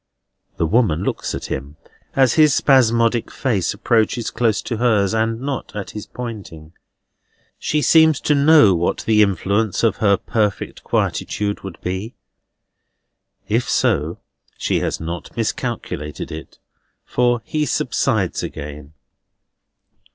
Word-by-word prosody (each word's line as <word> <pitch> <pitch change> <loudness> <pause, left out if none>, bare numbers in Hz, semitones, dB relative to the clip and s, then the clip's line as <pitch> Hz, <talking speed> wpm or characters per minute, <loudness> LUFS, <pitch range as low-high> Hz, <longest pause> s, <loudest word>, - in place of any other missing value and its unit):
The 80 - +1
woman 90 -3 +2
looks - - -2
at - - -6
him, 70 +3 -5 0.4
as 130 -3 +4
his 155 -3 +5
spasmodic 115 -3 +3
face 110 -9 -1
approaches 110 +2 0
close 115 -4 +1
to 115 - -3
hers, 110 -4 +2
and 115 0 0
not 135 -3 -5
at 100 -2 -5
his 105 - -8
pointing. 100 -10 -8 0.9
She 150 -1 0
seems 160 -3 +5
to 150 - +2
know 145 -7 +6
what 85 0 0
the 110 -1 +4
influence 100 +2 +1
of 115 - +2
her 100 -2 +3
perfect 105 -4 -2
quietude 100 -1 -1
would 95 -3 -9
be; 95 +6 -4 1.3
if - - 0
so, - - +1 0.4
she - - 0
has - - -2
not 85 0 -6
miscalculated 75 +1 -4
it, 80 +1 -9 0.5
for 120 -1 +1
he 150 +3 -1
subsides - - 0
again. 75 0 -7
110 Hz, 125 wpm, -20 LUFS, 95-125 Hz, 1.3 s, know